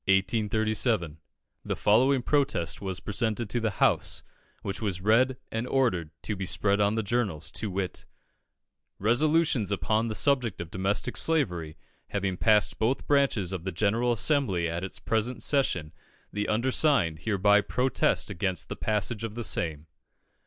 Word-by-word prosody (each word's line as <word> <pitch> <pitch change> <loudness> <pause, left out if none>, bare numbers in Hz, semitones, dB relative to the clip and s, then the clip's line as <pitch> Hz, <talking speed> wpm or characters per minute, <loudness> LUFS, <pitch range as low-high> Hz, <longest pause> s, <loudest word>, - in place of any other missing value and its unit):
_ 105 - +1 0.5
The - - -2
following 125 +5 +3
protest 135 - 0
was 95 -2 -2
presented 110 0 -2
to 120 - 0
the 110 -1 0
House, - - +1 0.4
which 100 +3 -4
was 100 -5 -2
read 120 +6 +3
and 115 +2 -2
ordered 105 - +1
to 105 - -1
be 95 - -5
spread 100 +3 +1
on 105 +1 +2
the 110 - 0
journals, 95 -9 -2
to 110 - -3
wit: 95 -1 -4 0.9
Resolutions 130 - +2
upon 110 +5 0
the 110 - -3
subject 130 -2 +1
of 85 -2 -6
domestic 100 +5 -1
slavery 90 - 0 0.3
having 100 -2 -2
passed 105 +2 +2
both 115 +5 0
branches 135 -10 +1
of 90 -3 -4
the 95 - -3
General 110 +6 +1
Assembly 115 - +1
at 85 +2 -3
its 95 - -5
present 115 +3 -1
session, 90 - 0 0.4
the 105 0 -2
undersigned 120 - +2
hereby 105 0 +3
protest 125 -2 0
against 95 -3 -2
the - - -4
passage 105 +1 -2
of 110 -1 -5
the 120 - -4
same. 80 -7 -2
105 Hz, 150 wpm, -28 LUFS, 95-120 Hz, 0.9 s, following